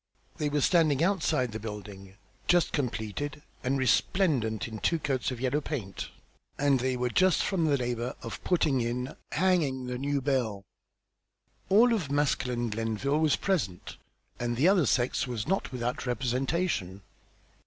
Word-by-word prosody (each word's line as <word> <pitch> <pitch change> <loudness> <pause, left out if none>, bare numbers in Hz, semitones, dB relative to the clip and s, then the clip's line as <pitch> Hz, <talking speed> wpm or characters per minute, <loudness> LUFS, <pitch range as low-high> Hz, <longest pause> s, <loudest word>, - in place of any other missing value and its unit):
They 150 - 0
were 145 0 0
standing 160 -3 +3
outside 160 - +1
the 110 - -5
building, 100 -3 -8 0.3
just 175 -1 +4
completed 140 +2 -3 0.2
and 135 +2 +1
resplendent 130 - +1
in 110 -2 -7
two 165 - +1
coats 135 -4 -1
of 125 -3 -5
yellow 130 +4 0
paint, 115 -11 -5 0.5
and 140 -2 +3
they 130 0 0
were 125 0 -1
just 185 +7 +3
from 180 -5 +1
the 145 -2 +3
labour 120 -1 -2
of 115 - -7
putting 155 -7 +2
in, 125 +3 -3 0.2
"hangin'" 150 -7 +1
the 125 0 -4
new 140 +1 0
bell. 125 -7 -1 1.1
All 230 +5 +6
of 180 -11 -1
masculine 125 -5 0
Glenville 115 +7 -1
was 155 -3 +3
present, 120 - -2 0.4
and 120 0 -1
the 145 +7 +4
other 185 -7 +4
sex 125 +3 +1
was 120 -1 -3
not 195 +3 0
without 125 +1 -3
representation. 125 - -1
130 Hz, 150 wpm, -29 LUFS, 120-150 Hz, 1.1 s, All